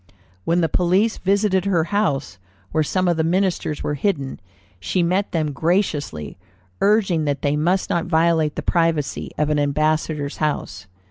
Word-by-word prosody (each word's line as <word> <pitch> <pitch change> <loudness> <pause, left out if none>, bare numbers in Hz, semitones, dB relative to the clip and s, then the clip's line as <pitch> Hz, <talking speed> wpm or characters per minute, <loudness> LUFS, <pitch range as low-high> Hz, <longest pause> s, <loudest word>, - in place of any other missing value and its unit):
"When 175 +1 +2
the 165 - +2
police 185 +7 +1
visited 195 -1 +1
her 180 -5 +2
house, 140 - 0 0.3
where 155 0 +2
some 185 +4 0
of 170 -2 +2
the 160 - +2
ministers 175 -3 0
were 150 - -1
hidden, 140 -3 -2 0.4
she 170 - 0
met 185 +4 0
them 155 -3 -1
graciously, 145 - -1 0.4
urging 195 -6 +2
that 145 -2 -2
they 145 0 +1
must 175 +5 0
not 170 - 0
violate 160 -2 +2
the - - -4
privacy 165 -5 0
of 150 0 +1
an 150 - +2
ambassador's 150 0 0
house. 100 - -3
160 Hz, 155 wpm, -21 LUFS, 145-185 Hz, 0.4 s, When